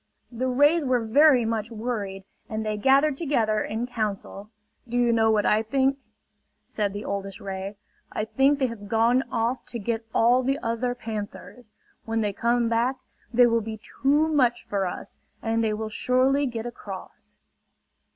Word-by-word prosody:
The 250 +2 -2
rays 290 +6 +4
were 250 -4 +1
very 265 +1 +5
much 225 -1 -2
worried, 215 -4 -4 0.3
and 220 0 -3
they 215 0 -1
gathered 270 +6 +3
together 230 -9 +1
in 220 +3 -3
council. 210 -3 -4 0.4
"Do 240 - -1
you 240 -1 +3
know 225 -1 +3
what 215 -2 +2
I 215 +1 +3
think?" 270 +4 +1 0.6
said 205 -2 -2
the 205 +2 -6
oldest 195 0 -4
ray. 195 +1 -5 0.4
"I 215 - -2
think 275 +5 +3
they 270 - +1
have 230 -4 -6
gone 230 +3 +3
off 235 +3 -1
to 245 - -5
get 225 +1 -2
all 240 +4 +4
the 270 +2 0
other 230 +2 -1
panthers. 220 +1 -7 0.4
When 225 0 -1
they 205 -2 -1
come 235 +2 +1
back, 235 +3 +1 0.4
they 245 0 +6
will 230 -1 +2
be 220 0 -6
too 280 +7 +1
much 250 -6 +2
for 195 -2 -1
us - - -7 0.2
and 225 0 +1
they 220 - +1
will 215 +1 -3
surely 260 +5 +2
get 230 -2 -5
across!" 200 -5 -9
230 Hz, 170 wpm, -25 LUFS, 215-255 Hz, 0.6 s, they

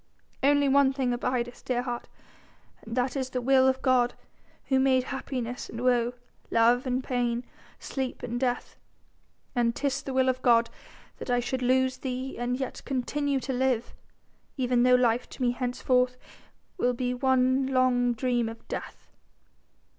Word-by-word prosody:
Only 285 +1 +4
one 275 0 +4
thing 260 -2 0
abideth, 245 0 -2
dear 245 -1 -1
heart, 240 -1 -4 0.7
and 230 +2 -7
that 250 +1 0
is 260 -2 -2
the 255 - -2
will 260 +1 +4
of 260 0 +1
God, 250 -2 +3 0.5
who 265 -1 +2
made 260 -1 +3
happiness 250 -2 -5
and 230 - -7
woe, 245 -1 +2 0.4
love 240 +3 +3
and 255 +1 0
pain, 245 -1 -1 0.3
sleep 265 -2 -5
and 240 0 -3
death. 245 -1 -2 0.8
And 235 -1 +1
'tis 275 -1 -1
the 270 - -5
will 260 0 +3
of 255 0 0
God 235 -2 +4 0.5
that - - -7
I 245 0 +3
should 255 +2 -2
lose 260 +1 +2
thee 260 0 -4
and 245 +1 -1
yet 265 - -4
continue 280 +1 -1
to 265 - -3
live, 250 -2 0 0.6
even 250 -2 +2
though 250 0 +6
life 245 -1 +2
to - - -11
me 245 - +3
henceforth 250 0 0 0.6
will 250 -4 +2
be 250 +1 -2
one 260 +1 +2
long 255 -2 +2
dream 240 -1 0
of 225 - -11
death. - - -7
250 Hz, 160 wpm, -27 LUFS, 245-260 Hz, 0.8 s, though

